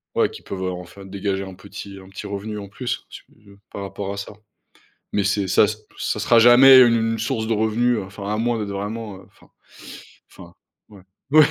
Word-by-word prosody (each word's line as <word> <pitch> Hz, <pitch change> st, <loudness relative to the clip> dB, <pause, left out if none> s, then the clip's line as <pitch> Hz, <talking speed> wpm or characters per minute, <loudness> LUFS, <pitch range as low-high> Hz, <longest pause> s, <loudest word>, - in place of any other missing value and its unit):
ouais, -, -, +3 dB
qui -, -, -11 dB
peuvent, 95 Hz, -1 st, -6 dB
heu, 90 Hz, -, -1 dB
enfin, 90 Hz, +2 st, -9 dB
dégager 100 Hz, 0 st, -3 dB
un 95 Hz, -1 st, -9 dB
petit 100 Hz, +1 st, -10 dB
un 95 Hz, 0 st, -14 dB
petit 100 Hz, +2 st, -9 dB
revenu 105 Hz, +2 st, -5 dB
en 100 Hz, -1 st, -7 dB
plus, 125 Hz, +5 st, -5 dB
su -, -, -11 dB, 0.5 s
par 100 Hz, -, -6 dB
rapport 100 Hz, 0 st, -5 dB
à -, -, -8 dB
ça. 100 Hz, -, -7 dB, 0.8 s
Mais 100 Hz, -, +1 dB
c'est 100 Hz, -1 st, 0 dB
ça 100 Hz, -, +5 dB, 0.3 s
ça -, -, -2 dB
sera 115 Hz, -1 st, +4 dB
jamais 130 Hz, +3 st, +9 dB
une 115 Hz, -2 st, +3 dB
source 115 Hz, -1 st, -2 dB
de 115 Hz, -, +1 dB
revenus, 110 Hz, +2 st, +1 dB
hein, 95 Hz, -, -6 dB
enfin 100 Hz, 0 st, -8 dB
à -, -, -1 dB
moins 120 Hz, +1 st, 0 dB
d'être 105 Hz, -1 st, -4 dB
vraiment, 105 Hz, 0 st, -5 dB
heu 95 Hz, -, -15 dB
enfin -, -, -24 dB, 0.8 s
enfin 85 Hz, 0 st, -14 dB, 0.3 s
ouais. 100 Hz, -3 st, -15 dB, 0.3 s
Oui, 155 Hz, -1 st, +8 dB
100 Hz, 205 wpm, -22 LUFS, 95-115 Hz, 0.8 s, jamais